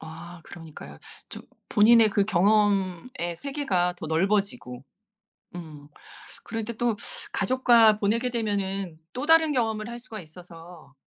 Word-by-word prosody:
아 170 +2 -11
그러니까요. 155 - -12 0.3
좀 - - -9 0.3
본인의 225 +1 +5
그 200 0 +1
경험의 195 -2 0
세계가 195 - -1
더 160 - -6
넓어지고. 190 - -1 0.7
음. 150 -4 -10 0.6
그런데 225 0 -5
또 235 -1 -1 0.4
가족과 230 -1 +4
보내게 230 +5 0
되면은 195 -7 -3
또 255 +3 -4
다른 320 -1 +5
경험을 220 -4 -1
할 240 0 -7
수가 230 -3 -10
있어서 165 -2 -14
200 Hz, 260 characters per minute, -25 LUFS, 170-230 Hz, 0.7 s, 본인의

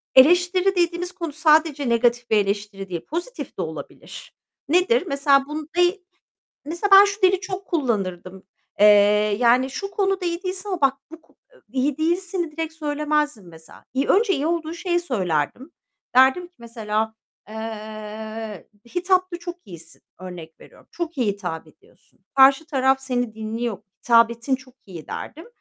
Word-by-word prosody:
eleştiri 355 +7 +5
dediğimiz 350 0 0
konu 335 -4 -6
sadece 305 -3 +3
negatif 240 +1 +1
bir 220 - +4
eleştiri 200 -1 -2
değil, 170 -2 -5
pozitif 350 +11 -6
de - - -2
olabilir. - - -8 0.4
Nedir? 365 +7 +3
Mesela 275 -2 +3
bun 305 +1 -6
deği 355 +1 +2 0.6
Mesela 340 +7 -3
ben 390 +1 +10
şu 405 0 -3
dili 375 0 +4
çok 380 0 -6
kullanırdım. 190 - -2 0.4
Eee, 210 - +8 0.5
yani 250 +2 +4
"Şu 395 +8 -5
konuda 390 -2 -1
iyi 340 +2 -3
değilsin 375 +2 -4
ama 370 -3 -3
bak 270 -1 +3 0.2
bu 325 0 -12
ko" - - -29 0.4
I 265 - -4
iyi 280 +2 0
değilsini 345 +1 -1
direkt 320 0 -4
söylemezdim 295 - -2
mesela. 160 -1 -16
İii, 270 +2 0
önce 410 +1 +3
iyi 290 0 -2
olduğu 330 -1 -2
şeyi 350 0 -1
söylerdim. 210 - -2 0.4
Derdim 265 +8 +5
ki 355 - -44
mesela, 220 -2 -3 0.3
eee, 215 -1 -7 0.3
"Hitapta 365 0 +1
çok 350 0 -7
iyisin." 170 -4 -13 0.2
örnek 175 -3 -10
veriyorum. - - -18
"Çok 335 -3 -5
iyi 245 - +1
hitap 175 -5 -6
ediyorsun. 155 - -25
Karşı 270 +3 +6
taraf 265 -2 +2
seni 245 -4 -2
dinliyor, 220 0 -4 0.2
hitabetin 235 +2 +3
çok 260 -1 -18
iyi." 170 -6 -10
derdim. 325 +6 -7
275 Hz, 150 wpm, -22 LUFS, 220-345 Hz, 0.6 s, ben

